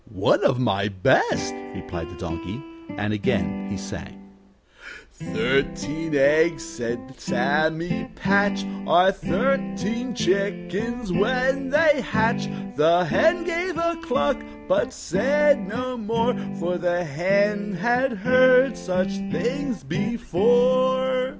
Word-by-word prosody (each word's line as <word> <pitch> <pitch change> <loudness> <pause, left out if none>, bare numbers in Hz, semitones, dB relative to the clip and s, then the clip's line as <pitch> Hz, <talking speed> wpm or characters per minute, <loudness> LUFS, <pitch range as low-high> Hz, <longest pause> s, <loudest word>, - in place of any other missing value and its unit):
"One - - +1
of - - +3
my 100 -5 +1
best," 95 -3 +1 0.2
replied 85 0 -6
the 90 - -11
Donkey. 85 +4 -6 0.4
And 105 +1 -2
again 100 -1 -1
he 100 - -4
sang: 100 0 -9 0.8
"'Thirteen 155 +2 -2
eggs,' 160 +4 +3
said 120 -4 -6
Sammy 170 +10 -1
Patch, 200 +1 +1 0.2
'Are 185 +2 +5
thirteen 220 +2 -2
chickens 200 +2 -2
when 255 +6 +1
they 295 -1 +4
hatch.' 220 0 0 0.3
The 170 +4 +4
hen 325 - +2
gave 350 0 -2
a 335 0 0
cluck, 145 - 0 0.3
but - - +1
said 275 - +1
no 250 +4 -4
more; 230 +2 0 0.2
For 180 -1 -2
the 175 0 0
hen 200 +6 0
had 245 +7 +1
heard 255 +4 +4
such 185 +1 -1 0.2
things 235 - -2
before. 245 - +1
195 Hz, 110 wpm, -23 LUFS, 160-250 Hz, 0.8 s, Are